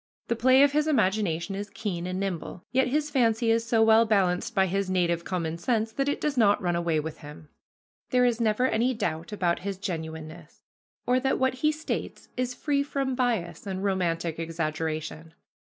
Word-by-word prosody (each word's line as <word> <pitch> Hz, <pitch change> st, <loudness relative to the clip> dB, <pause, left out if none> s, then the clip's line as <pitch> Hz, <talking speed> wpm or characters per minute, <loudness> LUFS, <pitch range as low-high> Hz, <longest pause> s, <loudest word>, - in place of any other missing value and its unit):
The 235 Hz, -, +2 dB
play 260 Hz, +4 st, +5 dB
of 285 Hz, -, +4 dB
his 300 Hz, +1 st, +1 dB
imagination 195 Hz, -, +1 dB
is 200 Hz, +1 st, -5 dB
keen 190 Hz, -3 st, -4 dB
and 185 Hz, +1 st, -3 dB
nimble, 185 Hz, -2 st, -4 dB
yet 265 Hz, 0 st, +3 dB
his 300 Hz, +3 st, 0 dB
fancy 230 Hz, -4 st, +2 dB
is 230 Hz, 0 st, +2 dB
so 225 Hz, -1 st, +4 dB
well 220 Hz, +1 st, +6 dB
balanced 195 Hz, -5 st, +1 dB
by 190 Hz, -, +4 dB
his 195 Hz, +1 st, -1 dB
native 170 Hz, -2 st, +1 dB
common 170 Hz, -3 st, -3 dB
sense 225 Hz, +3 st, 0 dB
that 275 Hz, +4 st, -1 dB
it 285 Hz, -, -1 dB
does 300 Hz, -2 st, -1 dB
not 210 Hz, -5 st, +4 dB
run 175 Hz, -2 st, 0 dB
away 170 Hz, -2 st, +1 dB
with 155 Hz, +1 st, -6 dB
him. 150 Hz, +1 st, -12 dB, 0.6 s
There 250 Hz, -1 st, +3 dB
is 240 Hz, -1 st, +1 dB
never 220 Hz, +2 st, +2 dB
any 245 Hz, +1 st, +1 dB
doubt 165 Hz, -6 st, -3 dB
about 180 Hz, -4 st, 0 dB
his 195 Hz, 0 st, -4 dB
genuineness, 160 Hz, -3 st, -7 dB, 0.4 s
or 250 Hz, +1 st, +3 dB
that 265 Hz, +1 st, +1 dB
what 260 Hz, 0 st, +2 dB
he 305 Hz, -, +4 dB
states 310 Hz, +1 st, -5 dB
is 250 Hz, 0 st, -2 dB
free 280 Hz, +2 st, 0 dB
from 275 Hz, -2 st, -2 dB
bias 235 Hz, -8 st, -1 dB
and 190 Hz, 0 st, -3 dB
romantic 170 Hz, -4 st, -1 dB
exaggeration. 160 Hz, 0 st, -4 dB
200 Hz, 185 wpm, -27 LUFS, 170-250 Hz, 0.6 s, well